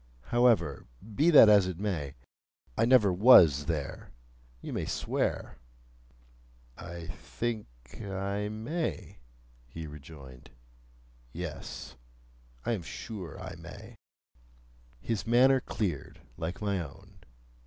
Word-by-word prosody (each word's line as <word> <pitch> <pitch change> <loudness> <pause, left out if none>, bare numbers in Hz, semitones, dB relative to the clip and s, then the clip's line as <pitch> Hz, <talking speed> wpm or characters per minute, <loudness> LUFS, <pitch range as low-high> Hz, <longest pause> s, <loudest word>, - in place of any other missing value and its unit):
However, 120 -1 +3 0.3
be 150 +10 +3
that 150 -9 +9
as 100 -3 +6
it 90 -3 -4
may, 85 -9 -3 0.6
I - - +2
never 115 -6 +5
was 85 - +7
there, 75 -4 -4 0.5
you - - -7
may - - -2
swear." - - -2 1.2
"I 85 -1 -8
think 110 +7 -4 0.3
I 100 +1 -3
may," 125 +11 -4 0.5
he 80 +6 -8
rejoined. 70 -3 -12 0.8
"Yes; 80 -6 -7 0.7
I - - 0
am 110 -6 -1
sure 90 -1 -8
I - - -7
may." - - -11 1.0
His 115 -1 -3
manner 130 +3 +5
cleared, 90 - -4 0.2
like 85 +5 -5
my 100 -2 0
own. 75 -5 -10
95 Hz, 105 wpm, -30 LUFS, 80-115 Hz, 1.2 s, that